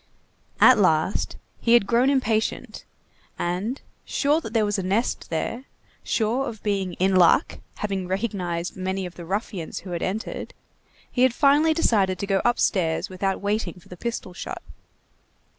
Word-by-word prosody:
At 255 -3 +7
last, 160 -1 +1 0.2
he 230 - +2
had 240 -4 +6
grown 240 +5 +3
impatient, 225 -5 -1 0.5
and, 190 +10 -2 0.2
sure 295 +3 +1
that 225 - -7
there 220 -2 +2
was 205 0 -1
a - - 0
nest 200 +6 -1
there, 230 +10 -3 0.4
sure 240 +5 0
of 220 -3 -10
being 195 -3 -1
in 190 +2 +1
"luck," 180 - +4 0.2
having 195 -3 -3
recognized 185 -4 -2
many 190 0 -2
of 175 - -7
the 175 - -9
ruffians 190 -2 -4
who 185 - -9
had 170 - -3
entered, 215 +5 -4 0.6
he 250 - -1
had 255 -2 +4
finally 300 +3 +4
decided 200 - +2
to 200 - -3
go 195 -1 +1
upstairs 185 -8 +1
without 190 +1 -2
waiting 205 -3 -1
for - - -21
the 180 - -8
pistol 230 -2 -5
shot. - - -7
200 Hz, 160 wpm, -24 LUFS, 185-235 Hz, 0.6 s, At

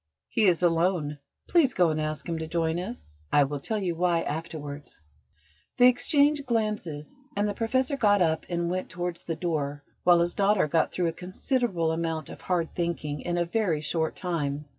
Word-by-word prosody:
He 225 - +2
is 180 -2 +3
alone: 165 -3 +1 0.3
please 320 -7 +3
go 175 -3 +4
and 155 0 -1
ask 155 +1 -3
him 165 -1 -2
to 160 - -4
join 165 0 0
us. 220 +7 -7 0.2
I 145 - +5
will 145 +1 -3
tell 220 +10 -2
you 185 -4 -1
why 170 0 +2
afterwards." 150 - -6 0.8
They 250 +1 +8
exchanged 285 +3 +2
glances, 210 -10 -2 0.2
and 205 +1 +1
the 205 - -1
Professor 260 +6 0
got 205 -4 +4
up 160 -3 +1
and 170 -1 -1
went 185 0 -3
towards 175 -1 -4
the 165 - -4
door, 145 -4 -2 0.2
while 175 -1 +6
his 175 0 0
daughter 200 -4 +3
got 160 +1 +1
through 175 -2 0
a - - -5
considerable 185 - -1
amount 160 -2 -2
of - - -11
hard 175 -3 -1
thinking 160 -4 -2
in 175 0 -2
a 170 - +1
very 175 -5 0
short 160 +1 -1
time. 150 -5 -2
170 Hz, 185 wpm, -27 LUFS, 160-200 Hz, 0.8 s, They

